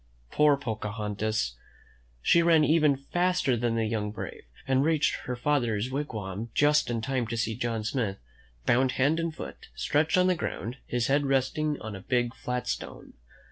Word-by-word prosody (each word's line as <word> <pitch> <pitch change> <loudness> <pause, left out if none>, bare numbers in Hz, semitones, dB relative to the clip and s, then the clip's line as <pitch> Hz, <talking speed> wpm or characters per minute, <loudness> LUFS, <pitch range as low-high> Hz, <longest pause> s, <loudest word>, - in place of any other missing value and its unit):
Poor 150 -1 +4
Pocahontas! 105 - -2 0.7
She 170 - +5
ran 165 -2 +5
even 150 -2 +4
faster 175 -1 +1
than 120 0 0
the 115 -1 +1
young 110 -1 -1
brave, 105 - -7 0.2
and 135 0 +3
reached 155 -1 +2
her 125 - -2
father's 120 -4 0
wig 145 +2 -2
wam 105 +1 -5
just 150 -1 +4
in 115 -2 -1
time 130 -1 -1
to 115 +1 -3
see 110 0 0
John 115 -1 -2
Smith, 110 -3 -1 0.5
bound 130 +2 +3
hand 145 +5 +2
and 165 0 -1
foot, 160 - -9
stretched 155 +3 +1
on 180 - +5
the 185 - +4
ground, 125 -6 -4
his 120 -1 0
head 140 +2 +2
resting 140 +3 0
on 110 -2 -6
a 95 - -8
big, 120 +2 0
flat 125 -1 -4
stone. - - -5
125 Hz, 175 wpm, -28 LUFS, 110-150 Hz, 0.7 s, She